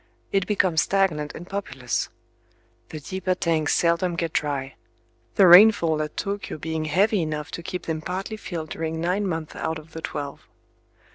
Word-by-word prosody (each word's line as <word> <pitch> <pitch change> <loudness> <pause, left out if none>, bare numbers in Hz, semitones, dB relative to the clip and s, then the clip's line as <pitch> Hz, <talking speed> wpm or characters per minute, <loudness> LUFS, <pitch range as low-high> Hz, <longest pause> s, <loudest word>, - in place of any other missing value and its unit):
It 195 -1 +1
becomes 185 -6 +2
stagnant 165 -7 0
and 175 - -9
populous. 135 - -3 0.8
The 155 - -6
deeper 185 +4 -2
tanks 165 -4 +1
seldom 170 +1 +2
get 165 -1 -2
dry;—the 140 +6 -2
rainfall 175 -4 +7
at 150 - -4
Tōkyō 200 -5 -4
being 160 0 -3
heavy 195 +6 +2
enough 155 0 -3
to - - -5
keep 180 +2 -5
them 160 -1 -2
partly 190 +6 -4
filled 165 -7 -6
during 160 0 -3
nine 185 +5 0
months 160 -3 -4
out 160 0 -2
of 155 +1 -13
the 160 - -7
twelve. 145 -3 -6
165 Hz, 155 wpm, -24 LUFS, 155-185 Hz, 0.8 s, rainfall